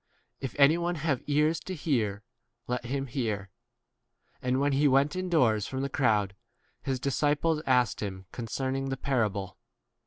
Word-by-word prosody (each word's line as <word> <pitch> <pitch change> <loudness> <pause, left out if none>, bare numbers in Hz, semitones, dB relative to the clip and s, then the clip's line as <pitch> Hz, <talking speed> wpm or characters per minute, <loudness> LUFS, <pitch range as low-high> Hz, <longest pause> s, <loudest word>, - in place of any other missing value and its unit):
If 135 -4 -5
any 145 +4 +6
one 175 +1 -1
have 150 -4 -1
ears 150 +2 +2
to 190 - -6
V - - -6
hear, 110 -9 0 0.4
let 125 0 -3
him 135 +3 -2
hear. 110 -6 -3 0.9
And 125 +1 +1
when 145 +1 +2
he 140 +2 +3
went 140 +4 +3
indoors 135 - +2
from 130 0 -3
the 140 - -1
crowd, 105 -8 +1 0.5
his 130 -2 -2
disciples 150 +4 +1
asked 125 -3 +2
him 95 -2 -5
concerning 130 +3 -3
18 - - -3
the 135 - -2
parable. 105 -8 -1
135 Hz, 160 wpm, -29 LUFS, 110-145 Hz, 0.9 s, any